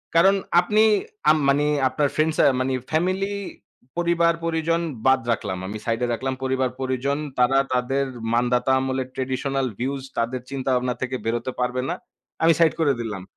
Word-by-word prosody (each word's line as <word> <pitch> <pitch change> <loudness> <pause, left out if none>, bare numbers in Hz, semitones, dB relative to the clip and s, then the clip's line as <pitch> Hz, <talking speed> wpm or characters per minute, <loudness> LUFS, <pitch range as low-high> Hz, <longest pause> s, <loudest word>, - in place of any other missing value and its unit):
কারণ 190 +4 +6 0.2
আপনি 210 +5 +2 0.5
আ - - +9 0.2
মানে 145 +2 +3 0.2
আপনার 145 +2 0
ফ্রেন্ড 155 +1 +2
সা - - +5 0.2
মানে 130 +1 0 0.2
ফামিলি 185 +5 0 0.7
পরিবার-পরিজন 170 -1 +1 0.2
বাদ 130 0 +5
রাখলাম। 95 -4 -2
আমি 105 +3 -5
সাইডে 115 +1 0
রাখলাম, 130 +3 -2
পরিবার-পরিজন। 130 +1 -1 0.2
তারা 125 +2 +4 0.2
তাদের 135 +2 0 0.3
মানদাতা 125 +2 +2
আমলের 130 -1 -2
ট্র্যাডিশনাল 135 +1 -1
ভিউস 135 +2 -2
তাদের 120 +2 -1
চিন্তাভাবনা 130 -2 0
থেকে 130 0 -2
বেরোতে 120 +3 -1
পারবে 125 +1 0
না। - - -1 0.5
আমি 165 - +6
সাইড 165 -2 +5
করে 145 -4 +3
দিলাম। 105 -5 -5
130 Hz, 145 wpm, -23 LUFS, 125-160 Hz, 0.7 s, আ